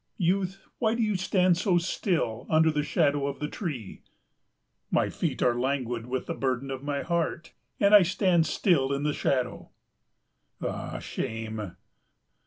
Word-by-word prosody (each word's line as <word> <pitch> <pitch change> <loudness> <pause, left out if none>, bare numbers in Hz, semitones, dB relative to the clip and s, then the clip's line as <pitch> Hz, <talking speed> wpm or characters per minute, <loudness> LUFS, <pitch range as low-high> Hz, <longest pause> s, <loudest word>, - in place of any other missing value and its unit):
"Youth, 190 +1 0
why 225 -2 +2
do 230 - +1
you 215 -2 +1
stand 185 -1 +2
so 180 -1 +2
still 170 - -1
under 160 0 +4
the 150 -1 0
shadow 145 -1 +1
of 140 - -4
the 150 - -3
tree?" 145 - -5 0.9
"My - - +1
feet - - -2
are 125 - +4
languid 125 -3 -1
with 130 +1 -2
the - - -3
burden 135 0 -2
of 130 -1 -4
my 145 0 -2
heart, 170 -1 -2 0.3
and 200 0 +4
I 210 - +10
stand 180 -2 +2
still 140 -9 +2
in 140 +1 -2
the 150 0 +1
shadow." 125 -4 -1 0.9
"Ah, - - -4
shame!" 110 -4 -5
150 Hz, 155 wpm, -27 LUFS, 130-185 Hz, 0.9 s, I